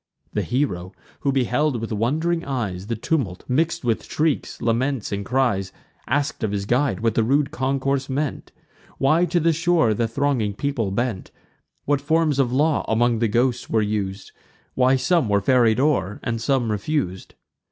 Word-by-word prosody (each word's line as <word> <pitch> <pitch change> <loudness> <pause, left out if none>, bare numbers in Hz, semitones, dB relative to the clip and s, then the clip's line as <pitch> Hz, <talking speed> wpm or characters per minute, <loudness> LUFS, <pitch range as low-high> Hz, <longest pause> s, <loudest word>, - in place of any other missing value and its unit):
The - - 0
hero, 95 -9 -2 0.3
who 140 - 0
beheld 135 0 +1
with 115 +1 -5
wond'ring 155 +11 0
eyes 105 -9 -3
The 115 - -1
tumult 110 - -2
mix'd 155 +6 0
with 115 -2 0
shrieks, 155 -2 -1
laments, 120 +1 -1
and 100 0 -2
cries, 110 -6 0 0.4
Ask'd 140 -1 -1
of 110 - 0
his 100 -1 -2
guide, 125 +2 +1
what 115 -1 +1
the - - +2
rude 140 +4 +1
concourse 135 -1 -1
meant; 145 +1 -3 0.5
Why 155 +6 +3
to 175 +1 +1
the 165 0 +3
shore 165 -7 +2
the 115 +2 0
thronging 115 -4 0
people 130 -5 -1
bent; 110 0 -2 0.6
What 145 -1 +1
forms 155 -1 +1
of 125 -3 +2
law 150 +3 +2
among 115 0 +2
the 115 - +2
ghosts 120 +3 0
were 110 -1 +2
us'd; 100 -2 -3 0.4
Why 130 +1 +3
some 165 - +1
were 100 0 +3
ferried 120 0 +3
o'er, 105 - +1
and 115 -1 -2
some 125 -2 +1
refus'd. 105 - -3
125 Hz, 165 wpm, -23 LUFS, 110-145 Hz, 0.6 s, Why